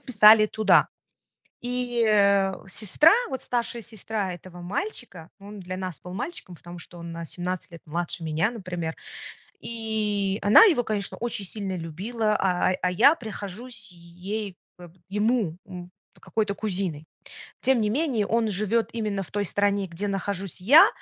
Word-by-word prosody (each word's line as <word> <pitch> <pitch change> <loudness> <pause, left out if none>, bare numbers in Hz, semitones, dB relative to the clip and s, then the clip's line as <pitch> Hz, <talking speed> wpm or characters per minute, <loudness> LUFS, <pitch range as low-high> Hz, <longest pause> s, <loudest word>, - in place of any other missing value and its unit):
писали 215 -3 +7
туда. 215 -1 +4 0.7
И, 245 -1 -1
э, 200 -2 +4 0.2
сестра, 220 - +4 0.2
вот 265 -2 -4
старшая 235 -1 -2
сестра 210 -3 -4
этого 175 0 -11
мальчика- 185 - -5
он 205 +1 -10
для 185 0 -6
нас 185 -3 -5
был 180 - -9
мальчиком, 215 - -6
потому 175 +1 -11
что 175 +1 -12
он 170 0 -7
на 170 0 -6
17 180 +2 -5
лет 170 - -11
младше 170 +1 -4
меня, 160 +8 0
например. 175 -7 -5 0.6
И 210 -3 -2
она 205 - +8
его, 320 - +3
конечно, 210 -3 -3
очень 230 -4 -3
сильно 195 -1 -4
любила, 210 +7 -2
а 185 -1 +2
а 180 - +1
я 245 - +6
прихожусь 215 - -8
ей 180 +4 -6 0.2
бэп 175 -1 -13
ему, 210 -4 0
м, 180 -1 -9 0.3
какой-то 210 -2 -2
кузиной. 185 -7 -3 0.6
Тем 260 -1 +3
не 210 - +1
менее, 245 -5 0
он 225 0 +1
живет 215 +3 0
именно 210 -4 -2
в 185 - -10
той 205 0 -1
стране, 200 +1 +1
где 185 +4 -5
нахожусь 195 -2 -3
я, 285 - +8
200 Hz, 150 wpm, -25 LUFS, 180-225 Hz, 0.7 s, она